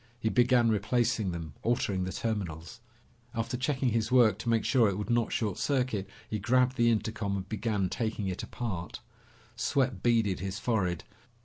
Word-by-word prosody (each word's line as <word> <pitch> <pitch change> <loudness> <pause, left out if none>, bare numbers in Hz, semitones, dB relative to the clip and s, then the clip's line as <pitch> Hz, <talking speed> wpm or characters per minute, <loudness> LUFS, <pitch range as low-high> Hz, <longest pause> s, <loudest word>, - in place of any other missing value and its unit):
He 110 - 0
began 120 0 +4
replacing 110 0 +1
them, 80 -3 -6
altering 100 -5 0
the 95 - -3
terminals. 95 -5 -4 0.6
After 115 +2 -2
checking 130 0 0
his 115 0 0
work, 115 -6 +5
to 115 - -3
make 115 -2 +2
sure 120 -6 +4
it 95 - -2
would 105 +3 -3
not 120 -1 +2
short 105 -5 -1
circuit, 125 -8 0 0.2
he 105 - -3
grabbed 125 +4 +2
the 120 -2 +3
intercom 110 -3 -1
and 95 0 -5
began 105 -2 -1
taking 110 0 -2
it 95 -1 -3
apart. 95 -8 -5 0.5
Sweat 130 -8 0
beaded 115 -5 +2
his 95 0 -4
forehead. 90 -8 0
110 Hz, 170 wpm, -30 LUFS, 100-120 Hz, 0.6 s, work